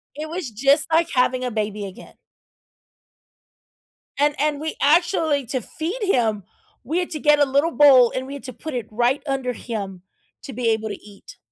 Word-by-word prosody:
It 310 +1 -6
was, 335 -6 -4
just, 275 +7 +2
like 325 +1 +3
having 255 0 +1
a 250 - -2
baby 210 -1 -3
again. 190 - -11 2.0
And 290 +1 +2
and 295 -1 0
we 315 +1 -4
actually 315 -2 +2
to 260 +2 -2
feed 330 - -5
him, 225 - +1 0.4
we 315 +9 -1
had 355 - -3
to 310 - -4
get 295 0 +4
a 290 - +5
little 280 +5 +1
bowl, 265 -5 +6
and 260 - -3
we 275 - -8
had 280 - -8
to 255 -2 -7
put 315 -3 -7
it 240 -3 -4
right 240 +5 +1
under 265 -2 -1
him 200 -6 -6 0.4
to 270 - -8
be 245 -2 -1
able 220 -1 0
to 205 - -4
eat. 205 -1 -15
270 Hz, 190 wpm, -22 LUFS, 230-300 Hz, 2.0 s, bowl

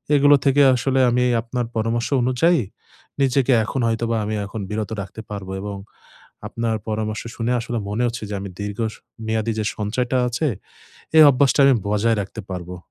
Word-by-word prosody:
এগুলো 145 0 +6
থেকে 140 +1 +4
আসলে 130 +2 0
আমি 125 +1 +2 0.2
আপনার 120 +1 -3
পরামর্শ 115 +1 0 0.2
অনুযায়ী 140 +6 +3 0.6
নিজেকে 135 0 +3
এখন 135 - -3
হয়তোবা 115 0 0
আমি 110 +1 -2
এখন 100 +1 -6
বিরত 105 -1 -3
রাখতে 100 +3 -8
পারবো 100 -2 -6
এবং 100 -1 -5 0.7
আপনার 115 -1 -2
পরামর্শ 110 0 -2
শুনে 115 +1 -1
আসলে 120 0 -3
মনে 110 +4 -1
হচ্ছে 115 -1 -4
যে 105 - -3
আমি 100 - -6
দীর্ঘ 100 -1 -5
স - - -11 0.3
মেয়াদী 110 0 0
যে - - -1
সঞ্চয়টা 120 +5 -1
আছে, 120 +6 -1 0.7
এই 155 - +10
অভ্যাসটা 140 +1 +3
আমি 135 - +6
বজায় 110 +2 +2
রাখতে 110 - -8
পারবো। 90 -1 -6
115 Hz, 165 wpm, -21 LUFS, 105-125 Hz, 0.7 s, এই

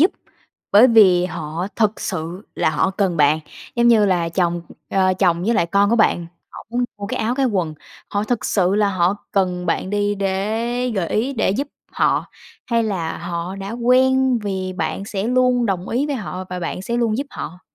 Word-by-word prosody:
giúp 345 - +6 0.6
bởi 215 +5 +8
vì 190 -7 +5
họ 165 0 -4
thực 215 -2 +1
sự 175 +2 -4
là - - +1
họ 190 - +1
cần 190 -3 0
bạn, 150 0 +4 0.4
giống 235 0 +4
như 220 -3 +5
là 175 -3 +1
chồng, 175 -1 0 0.3
ờ, 185 -1 +2
chồng 175 -2 +2
với 230 +3 +2
lại 170 - +2
con 200 +4 +2
của 235 - +3
bạn, 175 -6 +2 0.2
họ - - -11
muốn 245 +1 0
mua 200 - -5
cái - - -3
áo 230 +3 0
cái 270 -1 +1
quần, 180 -8 -1 0.4
họ 205 +1 -1
thực 240 -1 -2
sự 190 -1 +2
là 210 -1 +3
họ 185 +1 +1 0.2
cần 180 -2 0
bạn 180 +3 -1
đi 205 0 0
để 220 +6 -1
gợi 180 -5 -1
ý 240 +6 0
để 225 -7 +1
giúp 275 +9 -2 0.2
họ, - - +1 0.4
hay 230 -1 +1
là 185 -7 -2
họ 175 +2 -4
đã 195 +1 -6
quen 255 +1 +3
vì 190 -3 -3
bạn 195 +1 -3
sẽ 200 0 -3
luôn 250 -1 +2
đồng 190 -2 -2
ý 265 +5 0
với 290 - -2
họ 185 -5 -5
và 180 - -3
bạn 175 +2 -4
sẽ 235 +4 -2
luôn 230 -1 +1
giúp 280 - -2
họ? 180 +3 -7
200 Hz, 205 wpm, -20 LUFS, 180-235 Hz, 0.6 s, bởi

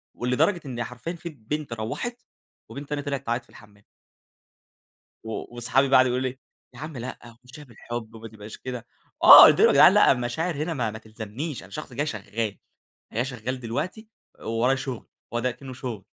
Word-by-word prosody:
ولدرجة 155 +9 +1
إن 120 -3 -4
حرفيًا 125 +7 -6
في 170 0 -7
بنت 145 0 -5
روّحت، 240 - -4 0.5
وبنت 140 +1 -8
تانية 145 0 -2
طِلعِت 140 -2 -4
تعيط 120 +1 -1
في - - -28
الحمام. 105 -2 -18 1.4
و 110 +2 -6
وصحابي 130 +3 +2
بقي 135 - +5
قعدوا 130 -1 +5
يقولوا 130 +1 -1
لي: 130 - -14 0.4
"يا - - -13
عم 155 -1 -7
لأ، 120 -1 -8
مشيها 140 +4 -12
بالحب 120 -2 -8
وما 115 0 -9
تبقاش 105 0 -11
كده." 125 -3 -7 0.4
آه، - - +12
قلت - - +5
لهم: - - +7
"يا - - +4
جدعان - - +7
لأ - - +6
المشاعر 135 +7 -2
هنا 155 +3 -2
ما 120 -6 -1
ما 110 - -8
تلزمنيش، 110 +7 -7
أنا - - -14
شخص 150 -4 -7
جاي 145 +5 -2
شغال 110 -3 -4 0.5
جاي 120 +3 0
شغال 130 0 -5
دلوقتي، 155 - -4 0.3
وورايا 120 +4 +1
شغل." 130 -3 -6 0.3
هو 120 - +1
ده 125 - 0
أكنُه 130 +2 -8
شغل. 120 -6 -6
125 Hz, 185 wpm, -25 LUFS, 115-145 Hz, 1.4 s, آه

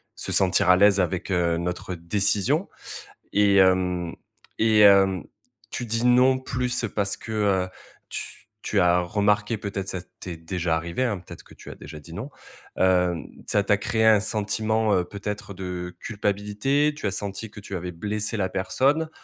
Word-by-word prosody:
se - - -6
sentir 90 -1 +3
à 90 - +7
l'aise 100 0 +5
avec, 90 +2 -2
heu, 85 -2 +1
notre 90 +1 -4
décision 100 +4 0 0.6
et 100 -1 +4
hem 90 -2 +2 0.5
et 110 -1 +4
hem, 95 -4 +6 0.5
tu 120 - -4
dis 115 +1 -2
non 125 +1 +5
plus 125 -1 -2
parce 100 -2 0
que, 110 - -9
heu, 100 -4 +1 0.4
tu - - -6 0.3
tu 100 -3 +1
as 90 0 +4
remarqué, 105 +3 +1
peut-être, 100 -2 -5
ça 95 - -2 0.2
t'est 90 -2 -6
déjà 85 0 -2
arrivé, 85 +9 -2
hein, 105 -6 -1
peut-être 85 - -12
que - - -16
tu - - -13
as - - -8
déjà 75 +1 -10
dit 80 +3 -12
non, 120 +10 -6 0.5
hem, 90 -3 +2 0.2
ça 100 - +2
t'a 105 0 +2
créé 110 +2 0
un 110 -2 +6
sentiment, 110 0 0
heu, 90 -1 +1
peut-être 100 +1 -6
de 90 -1 -6
culpabilité? 105 +8 0
Tu 105 - -3
as - - -1
senti 100 +2 -5
que 105 - -11
tu 100 - -7
avais 90 +1 -5
blessé 105 +5 -2
la 95 -2 0
personne 140 +12 +1
100 Hz, 170 wpm, -24 LUFS, 90-110 Hz, 0.6 s, à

